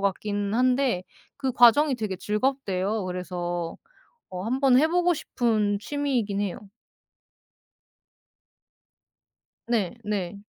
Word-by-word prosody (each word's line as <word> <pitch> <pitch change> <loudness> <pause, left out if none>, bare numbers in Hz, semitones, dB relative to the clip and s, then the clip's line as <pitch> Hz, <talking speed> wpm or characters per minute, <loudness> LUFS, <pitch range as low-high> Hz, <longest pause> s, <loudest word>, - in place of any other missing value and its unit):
같긴 205 +1 -1
한데 250 -5 +2 0.3
그 265 -2 -2
과정이 250 +4 +6
되게 210 -5 -3
즐겁대요. 210 -2 -1
그래서 175 -2 -4 0.5
어 180 -1 -5
한번 255 +2 +3
해 310 - +5
보고 355 +1 +2
싶은 215 -8 0
취미이긴 245 -6 -1
해요. 200 +1 -5 3.0
네, 230 -3 0
네. 200 -2 -3
215 Hz, 190 characters per minute, -26 LUFS, 195-260 Hz, 3.0 s, 과정이